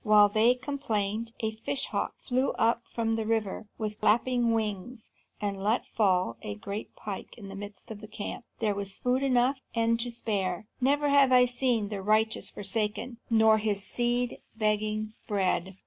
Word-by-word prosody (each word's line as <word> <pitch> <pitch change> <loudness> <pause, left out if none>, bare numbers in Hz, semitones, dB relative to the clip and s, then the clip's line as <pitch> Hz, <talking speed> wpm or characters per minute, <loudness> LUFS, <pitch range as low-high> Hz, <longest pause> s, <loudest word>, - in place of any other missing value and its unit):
While 210 -1 +7
they 220 +4 +4
complained, 230 -5 -2
a 220 -1 0
fish 265 +4 -2
hawk - - -2
flew 255 +1 0
up 230 +1 +2
from 225 -1 -1
the 225 - -1
river 220 -1 -1
with 215 -1 -4
flapping 240 +1 +3
wings, 220 +1 -3 0.3
and 200 -2 -3
let 215 +4 +1
fall 185 - +1
a 105 - -5
great 200 - -6
pike 200 -2 -7
in 200 -4 -9
the 195 - -7
midst 205 +2 -8
of 210 -1 -7
the 215 - -9
camp. 210 +3 -6
There 215 -2 +1
was 200 -1 -4
food 250 +1 +1
enough 260 0 +2 0.2
and 230 0 +2
to 245 +1 -2
spare. 205 -5 -2 0.2
Never 285 +3 +3
have 280 -2 +5
I 250 -1 +7
seen 245 -4 0
the 205 -2 -4
righteous 215 +2 +1
forsaken, 215 +4 -3
nor 220 -1 +5
his 205 -2 0
seed 240 0 0 0.2
begging 215 0 0
bread." 190 -2 0
220 Hz, 170 wpm, -29 LUFS, 205-240 Hz, 0.3 s, While